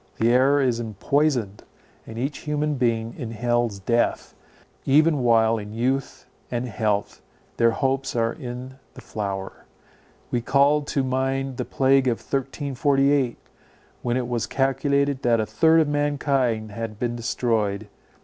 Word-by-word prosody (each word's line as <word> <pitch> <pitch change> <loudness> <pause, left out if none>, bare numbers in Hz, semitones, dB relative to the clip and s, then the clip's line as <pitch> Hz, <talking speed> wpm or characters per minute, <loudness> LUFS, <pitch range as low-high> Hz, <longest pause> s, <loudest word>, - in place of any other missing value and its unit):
The 115 - +2
air 135 +3 +4
is 125 -4 +1
empoisoned, 120 0 -1 0.4
and 110 - -8
each 135 +5 -3
human 150 0 -1
being 115 -3 0
inhales 120 -2 -1
death, 115 +5 0 0.5
even 150 +2 +4
while 115 -2 +3
in 105 0 -8
youth 130 +2 -2 0.2
and 120 +1 -2
health, 105 -2 -2 0.4
their 115 0 +4
hopes 135 +2 -1
are 115 -1 +1
in 130 0 -8 0.2
the - - -10
flower. 100 -2 -5 0.7
We 120 - 0
called 145 +4 +3
to 135 - 0
mind 135 0 -1
the - - -2
plague 135 0 +2
of 120 -2 +1
1348, 135 -1 0 0.6
when 120 0 0
it 125 -2 -2
was 120 -2 -2
calculated 140 0 +1
that 120 -2 +2
a 110 - 0
third 160 +7 +4
of 155 - +1
mankind 140 -6 0
had 110 0 -5
been 120 +1 -2
destroyed. 110 -4 -1
125 Hz, 140 wpm, -24 LUFS, 115-140 Hz, 0.7 s, air